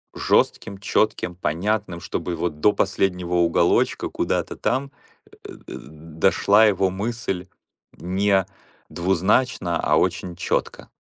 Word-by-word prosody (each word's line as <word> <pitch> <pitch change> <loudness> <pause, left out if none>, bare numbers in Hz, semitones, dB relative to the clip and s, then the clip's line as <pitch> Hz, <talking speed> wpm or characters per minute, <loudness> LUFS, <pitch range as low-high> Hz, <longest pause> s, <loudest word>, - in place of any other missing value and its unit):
жестким, 100 - +1
четким, 100 -2 0
понятным, 90 +3 -2
чтобы 85 0 -4
вот 80 -3 -3
до 105 - +5
последнего 90 -2 -1
уголочка, 85 -1 +2
куда-то - - -2
там, 135 +1 -1 0.4
э - - -19
э, - - -7 0.2
д - - -7 0.4
дошла 110 - +4
его 95 -2 +2
мысль 95 -2 -4 0.5
не 95 +1 +1 0.4
двузначно, 95 +1 +1
а - - +2
очень 90 -2 -1
четко. 85 - -3
95 Hz, 115 wpm, -22 LUFS, 85-105 Hz, 0.5 s, до